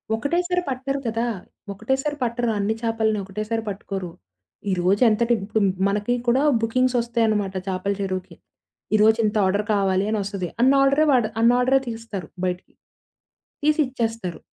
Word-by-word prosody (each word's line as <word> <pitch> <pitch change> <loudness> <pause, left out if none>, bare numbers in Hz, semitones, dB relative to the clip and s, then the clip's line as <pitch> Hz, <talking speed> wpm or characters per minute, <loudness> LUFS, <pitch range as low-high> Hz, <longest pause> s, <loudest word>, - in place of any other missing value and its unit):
ఒకటేసారి 355 +9 0
పట్టరు 270 +2 -2
కదా! 230 +1 -1 0.5
ఒకటేసారి 265 +8 -1
పట్టరు. 240 0 -1
అన్ని 205 +2 +1
చాపల‌నోకటేసారి 220 -1 -1
పట్టుకోరు. 195 -2 -5 0.6
ఈరోజేంతటి 215 +6 +3
ఇప్పుడు 215 +2 -1 0.3
మనకి 205 +4 0
కూడా 250 +3 +3 0.2
బుకింగ్స్‌సోస్తాయన్నమాట 230 -4 +1
చేపల 190 +1 -1
చెరువుకి. 185 -2 -4 0.6
ఈరోజింత 220 0 +3
ఆర్డర్ 200 +2 +1
కావాలి 195 -1 +1
అనోస్తది. 200 -3 -2
అన్నీ 265 +2 +5
ఆర్డరే 275 +3 +4
వాడ్ 245 -4 +3
అన్నీ 235 +1 +5
ఆర్డరే 260 +2 +3
తీస్తారు 225 -7 -6 0.2
బయటికి. 180 0 -4 0.9
తీసిచ్చేస్తారు. 235 - 0
225 Hz, 110 wpm, -23 LUFS, 200-250 Hz, 0.9 s, అన్నీ